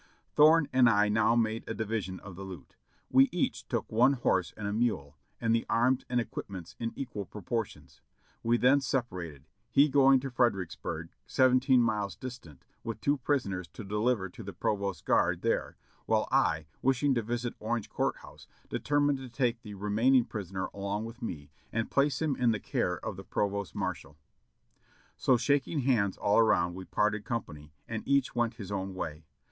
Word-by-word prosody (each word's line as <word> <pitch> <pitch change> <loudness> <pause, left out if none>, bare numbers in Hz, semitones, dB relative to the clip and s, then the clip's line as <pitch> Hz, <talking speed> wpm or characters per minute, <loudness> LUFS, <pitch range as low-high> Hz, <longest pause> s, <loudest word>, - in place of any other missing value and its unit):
Thorne 155 0 +6
and 125 -2 +6
I 105 -1 +3
now 110 +2 +3
made 115 -1 +1
a - - -3
division 105 -4 -3
of 95 -2 -10
the 95 - -9
loot. 90 -8 -10 0.4
We 135 +1 +6
each 175 0 -2
took - - -3
one 125 +5 +5
horse 95 -8 +1
and 105 - -4
a 100 - -2
mule 105 - -1 0.2
and 115 -1 +1
the 115 - +2
arms 125 +3 +2
and 125 -1 +1
equipments 95 -6 -6
in 115 -1 -2
equal 120 -7 -5
pro 105 +2 -10
portions; 115 +1 -4 0.4
we 115 +1 +2
then 130 +4 +4
separated, 90 - -3 0.2
he 145 +2 +5
going 135 -1 +6
to 135 0 -5
Fredericksburg, 95 -8 -1 0.2
sev 130 -1 +4
enteen 130 0 +4
miles 105 -4 0
distant, 120 - -10 0.2
with 115 -1 -5
two 140 +6 +1
prisoners 100 - -1
to 115 - -8
deliver 105 0 0
to 90 - -11
the - - -7
pro 105 - 0
vost 100 -1 -4
guard - - +2
there, - - -1 0.3
while - - +2
I, 80 -1 +2 0.2
wishing 135 +2 +2
to 120 - +1
visit 120 +2 -3
Orange 110 0 -2
Court - - -1
House, - - -14 0.2
determined 145 -1 +1
to 130 -1 -8
take 120 -2 0
the 105 -4 -9
remaining 115 +6 +3
prisoner 95 -4 -4
along 100 +2 -3
with 115 +3 -10
me 75 -10 -6 0.2
and 115 0 -2
place 140 +3 +2
him 150 -4 +1
in 125 -2 +2
the 110 -2 +1
care - - -1
of - - -4
the - - -8
provost 100 -1 -2
marshal. - - -4 1.0
So 130 - +3
shaking 140 +4 +1
hands 115 -7 +1
all 100 +2 +3
around, 85 -6 +3
we 95 +1 -8
parted 105 +1 0
company, 75 -11 -5 0.2
and 110 -1 -3
each 140 -1 +2
went 120 -1 0
his 100 -3 -8
own 95 -1 -3
way. 80 -3 -5
115 Hz, 185 wpm, -30 LUFS, 100-130 Hz, 1.0 s, Thorne